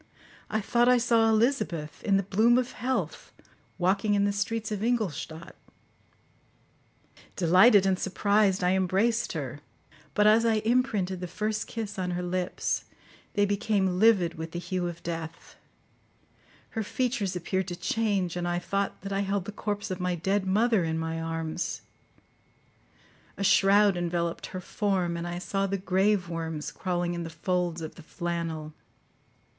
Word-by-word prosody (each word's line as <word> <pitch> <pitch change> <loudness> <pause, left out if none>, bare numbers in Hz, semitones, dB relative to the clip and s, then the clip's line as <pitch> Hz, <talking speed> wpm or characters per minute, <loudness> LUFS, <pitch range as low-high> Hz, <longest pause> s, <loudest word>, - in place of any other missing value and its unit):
I 220 - 0
thought 240 +4 +3
I 250 - +6
saw 230 -2 +3
Elizabeth, 215 - 0
in 195 -2 +3
the 195 - 0
bloom 220 +6 +3
of 250 -1 0
health, 255 +1 -3 0.5
walking 195 +3 +2
in 200 0 +3
the 205 - +2
streets 220 +2 -2
of 205 -2 -2
Ingolstadt. 175 - -2 1.8
Delighted 190 +4 +6
and 190 -1 +2
surprised, 200 0 +2
I 180 - +3
embraced 190 +5 +1
her, 145 -3 -5 0.6
but 210 - +4
as 215 +2 +6
I 230 -1 +3
imprinted 215 -7 +1
the 180 - -4
first 215 +4 -2
kiss 210 -4 -5
on 180 -1 -1
her 180 - -3
lips, 180 0 -2 0.5
they 205 0 +4
became 200 -3 0
livid 190 -7 +4
with 160 0 -6
the - - -3
hue 180 0 -2
of 170 -1 -7
death; 165 -1 -6 1.2
her 225 - -2
features 220 -3 -1
appeared 190 +1 -2
to 175 - -4
change, 190 -1 0
and 175 0 -2
I 175 0 0
thought 195 +3 -2
that 195 +1 -5
I 195 - 0
held 200 -1 -1
the 210 - -5
corpse 205 0 -4
of 185 - -3
my 180 -1 0
dead 190 +3 0
mother 215 0 +3
in 160 0 -1
my 160 0 -3
arms; 165 +1 -3 1.6
a 200 - -2
shroud 200 +1 +5
enveloped 170 -1 -2
her 185 - -6
form, 185 -3 -1
and 170 0 -4
I 175 0 -4
saw 195 +2 -1
the 195 +1 -1
grave 190 0 +1
worms 165 -2 -4
crawling 175 -1 -2
in 170 - -3
the 165 - -5
folds 175 +1 -1
of 160 - -6
the - - -13
flannel. 165 -2 -4
190 Hz, 160 wpm, -28 LUFS, 175-210 Hz, 1.8 s, I